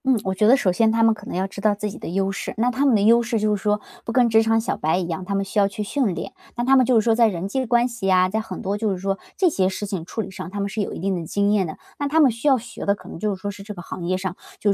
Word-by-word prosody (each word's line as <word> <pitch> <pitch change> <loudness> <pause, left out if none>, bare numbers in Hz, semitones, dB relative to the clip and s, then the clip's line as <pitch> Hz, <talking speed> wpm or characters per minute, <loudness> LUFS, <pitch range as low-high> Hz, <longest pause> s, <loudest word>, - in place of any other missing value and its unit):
嗯， 260 -4 +3
我 190 - -1
觉 210 +3 +2
得 255 +4 +7
首 195 -9 +2
先 220 +4 +3
他 225 0 +2
们 225 0 +5
可 210 0 -12
能 - - -5
要 185 +1 0
知 195 +1 -8
道 210 0 +3
自 210 0 -4
己 - - -10
的 - - -7
优 195 +2 0
势， 195 - -5
那 240 +3 +2
他 270 +3 +1
们 255 - +4
的 205 - +2
优 230 +3 +5
势 235 -1 -1
就 210 0 +1
是 200 - -6
说 210 0 +1 0.2
不 - - -4
跟 245 0 +3
职 220 0 +5
场 225 0 +2
小 225 - -2
白 160 +3 0
一 185 - -1
样， 170 +2 -4
他 200 +1 -2
们 195 0 0
需 200 +2 -1
要 200 - +4
去 200 +2 -5
训 215 -3 0
练。 - - -6 0.2
那 240 - 0
他 270 +1 +5
们 255 -2 +4
就 245 -3 +5
是 - - 0
说 230 - +4
在 230 0 +5
人 185 -3 -3
际 260 +5 -2
关 240 +1 +3
系 230 -6 -2
啊， 185 0 +5
在 215 +4 -1
很 220 - -7
多 195 +1 -1
就 220 -1 0
是 190 - -2
说 195 +1 -2 0.2
这 375 - +3
些 190 - +2
事 200 +2 -4
情 195 -5 -4
处 205 +6 -4
理 195 -2 -7
上， 185 - -7
他 205 +2 -6
们 200 - -1
是 215 +1 -3
有 - - -3
一 - - -6
定 190 +2 -1
的 170 - -4
经 200 +3 +1
验 200 -4 +2
的。 155 - -8 0.2
那 285 - 0
他 310 +3 +2
们 280 -5 +6
需 230 +6 -4
要 270 -2 +5
学 240 0 -8
的 200 - +3
可 - - -16
能 - - -8
就 210 +1 -1
是 - - -15
说 205 +1 -4
是 200 0 -11
这 210 +1 -8
个 175 - -9
行 180 - -7
业 185 +1 0
上， 185 -1 -4 0.2
就 205 - +2
210 Hz, 390 characters per minute, -22 LUFS, 195-230 Hz, 0.2 s, 得